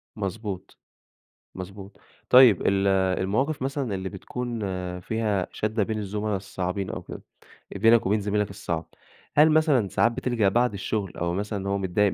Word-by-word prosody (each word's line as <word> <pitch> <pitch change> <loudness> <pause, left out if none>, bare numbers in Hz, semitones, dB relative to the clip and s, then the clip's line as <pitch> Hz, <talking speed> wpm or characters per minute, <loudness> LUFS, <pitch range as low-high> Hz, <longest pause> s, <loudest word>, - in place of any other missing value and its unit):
مضبوط، 100 -1 -5 0.8
مضبوط. 95 +1 -9 0.3
طيب 125 -6 +8
ال 100 0 +2 0.3
المواقف 130 +10 0
مثلًا 135 -5 -2
اللي 95 0 -3
بتكون 120 +4 -5 0.4
فيها 105 -2 -1
شَدة 110 0 -1
بين 110 +2 -2
الزملا 105 0 -2
الصعبين 95 0 -4
أو - - -5
كده - - -9 0.5
بينك 115 +2 +4
وبين 105 +2 +2
زميلك 105 0 0
الصعب، 85 -4 -4 0.5
هل 150 +2 +7
مثلًا 150 - +3
ساعات 115 +5 +2
بتلجأ 115 -4 +1
بعد 120 +2 +2
الشغل 100 -1 -3
أو 85 0 -1
مثلًا 100 +2 -3
اللي 100 - -4
هو 100 - +1
متضايق 95 +1 +1
105 Hz, 150 wpm, -25 LUFS, 95-115 Hz, 0.8 s, طيب